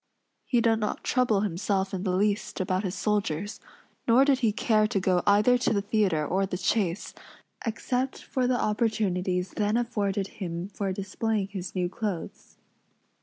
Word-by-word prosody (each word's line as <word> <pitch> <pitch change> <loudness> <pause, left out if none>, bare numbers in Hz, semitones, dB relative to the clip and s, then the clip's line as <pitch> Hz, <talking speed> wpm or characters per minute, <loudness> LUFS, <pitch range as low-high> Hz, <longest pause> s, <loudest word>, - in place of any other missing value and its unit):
He 240 -2 +3
did 225 -1 +3
not 210 - -2
trouble 245 -6 +2
himself 195 0 -1
in 185 - -2
the 185 -2 0
least 205 +2 0
about 185 +1 0
his 190 -1 -2
soldiers; 205 -2 -1 0.5
nor 245 +3 +6
did 275 -2 +3
he 230 -5 +2
care 215 0 +2
to 205 - 0
go 185 -1 +2
either 210 +5 +5
to 240 - +1
the 200 - +1
theatre 200 -8 +1
or 190 +5 0
the 180 - -3
chase, 185 0 0 0.5
except 250 +3 -1
for 255 -2 -1
the 250 -1 +1
opportunities 190 -5 0
then 210 +1 0
afforded 205 -5 -1 0.2
him 175 +1 -4
for 200 -1 -3
displaying 200 +1 -2
his 190 -2 -6
new 180 -1 +1
clothes. 190 -2 -5
205 Hz, 165 wpm, -27 LUFS, 185-225 Hz, 0.5 s, nor